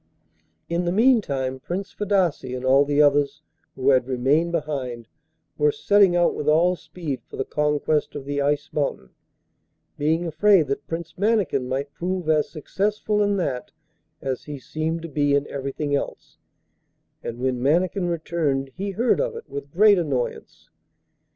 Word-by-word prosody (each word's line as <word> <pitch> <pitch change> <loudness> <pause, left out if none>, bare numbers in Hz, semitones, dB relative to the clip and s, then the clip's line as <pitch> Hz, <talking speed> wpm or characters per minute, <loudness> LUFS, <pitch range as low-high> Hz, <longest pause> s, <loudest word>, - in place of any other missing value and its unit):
In 170 +1 -1
the 175 - +1
meantime 175 - +2
Prince 190 +8 -5
Fadasse 195 -6 +1
and 130 0 -5
all 135 +2 +5
the 145 0 0
others 145 +1 +2 0.3
who 135 +1 +2
had 130 -2 +3
remained 135 +6 +1
behind 135 -8 -3 0.5
were 445 0 +4
setting 205 - +4
out 175 0 +3
with 150 - -1
all 170 +4 +4
speed 155 -8 -6
for - - -10
the 135 - -1
conquest 150 0 0
of 140 -2 -6
the 145 0 -1
Ice 145 +1 -1
Mountain, 135 - -2 0.9
being 160 +4 +1
afraid 180 +1 +4
that 140 +1 -3
Prince 165 +1 -6
Mannikin 200 - +1
might 140 +2 -3
prove 180 0 -3
as 155 -1 +2
successful 210 +6 -1
in 205 -1 +2
that 135 -9 -2 0.5
as 130 -2 -3
he 150 -1 -6
seemed 160 +4 -3
to - - -4
be 145 -2 +1
in 140 0 +1
everything 140 +1 -3
else, 140 - -5 0.8
and 120 - -5
when 125 0 -1
Mannikin 175 +6 +1
returned 155 -5 -1
he 200 +2 -3
heard 230 - +1
of - - -2
it 460 - -9
with 140 0 -7
great 205 +2 +5
annoyance. 135 -7 -4
150 Hz, 155 wpm, -23 LUFS, 140-180 Hz, 0.9 s, all